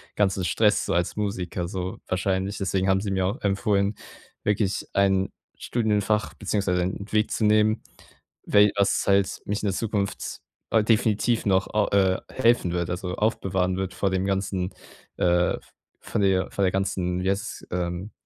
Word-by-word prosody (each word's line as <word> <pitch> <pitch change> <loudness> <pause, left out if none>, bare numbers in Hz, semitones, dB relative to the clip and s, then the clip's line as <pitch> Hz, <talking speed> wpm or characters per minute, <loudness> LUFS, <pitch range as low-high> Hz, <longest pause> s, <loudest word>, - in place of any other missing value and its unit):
ganzen 95 -2 +1
Stress 105 +2 +2
so - - -1
als 85 0 0
Musiker 95 -4 -2
so 95 -1 -4
wahrscheinlich. 95 +1 -1
Deswegen 95 0 0
haben 95 0 +4
sie 100 -1 -3
mir 95 -1 +1
auch 100 +6 -3
empfohlen, 100 0 +1 0.5
wirklich 105 -1 0
ein 95 -1 +2 0.3
Studienfach 105 -2 0
beziehungsweise 100 -3 0
einen 95 +3 -4
Weg 110 0 +2
zu 110 - 0
nehmen, 110 +1 +3 0.6
we 105 0 +5
was 100 -1 +2
halt 100 -1 +2
mich 105 +1 -2
in - - +1
der 95 - 0
Zukunft, 100 -3 -2 0.3
äh, 110 -2 +4
definitiv 110 +1 +2
noch, 95 -1 +2
ah, 105 -1 +2
äh, 95 -2 +3
helfen 120 -8 +3
wird, 85 0 -1
also, 90 0 -3
aufbewahren 95 -4 0
wird 95 -1 -3
vor 100 - 0
dem 95 0 0
ganzen, 95 -1 -1 0.4
äh, 90 0 +2
v - - -26 0.4
von - - -2
der 95 -1 +2
von 100 - -1
der 95 - +3
ganzen 90 -2 -1
wie 95 - +1
heißt, 100 - -5
ähm, 90 +3 -3
95 Hz, 170 wpm, -25 LUFS, 95-105 Hz, 0.6 s, we